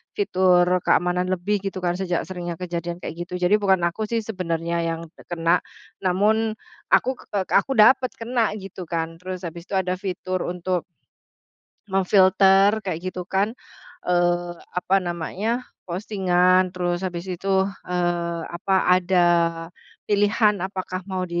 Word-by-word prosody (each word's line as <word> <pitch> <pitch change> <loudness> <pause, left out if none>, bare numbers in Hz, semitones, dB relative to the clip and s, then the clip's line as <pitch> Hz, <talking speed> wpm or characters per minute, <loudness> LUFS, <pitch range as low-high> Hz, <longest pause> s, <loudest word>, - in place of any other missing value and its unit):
fitur 185 - +3 0.2
keamanan 180 0 +2
lebih 195 +3 0
gitu 190 -1 -4
kan 175 0 0
sejak 180 -2 -1
seringnya 175 -2 -5
kejadian 175 -1 -4
kayak 160 - -6
gitu. 180 - -7
Jadi 180 +4 +4
bukan 195 -3 +3
aku 175 +6 -3
sih 230 +2 -1
sebenernya 170 -5 -2
yang 165 0 -3 0.2
kena 170 0 +2 0.5
namun 215 +4 +2 0.4
aku, 260 +1 +4 0.2
eee, 195 -2 0
aku - - +2
dapet 255 +3 +5
kena 230 -1 0
gitu 190 -1 -8
kan 165 0 -3
terus 185 0 -6
habis 170 +1 -7
itu - - -9
ada 185 -1 0
fitur 185 -1 -3
untuk 180 0 -2 1.1
memfilter 195 +2 +5
kayak 185 -3 -4
gitu 180 -1 -6
kan, 195 +3 +1 0.6
eee, 175 0 +1 0.3
apa 185 +2 +2
namanya, 190 +8 -3 0.2
postingan 185 -1 +2
terus 175 0 -2
habis 180 -1 -4
itu, 190 +1 0 0.2
eee, 175 -1 -1
apa 175 +3 -2 0.3
ada 175 -1 +3 0.8
pilihan 205 -1 +2
apakah 185 -1 -4
mau 185 -1 -2
185 Hz, 135 wpm, -23 LUFS, 175-195 Hz, 1.1 s, dapet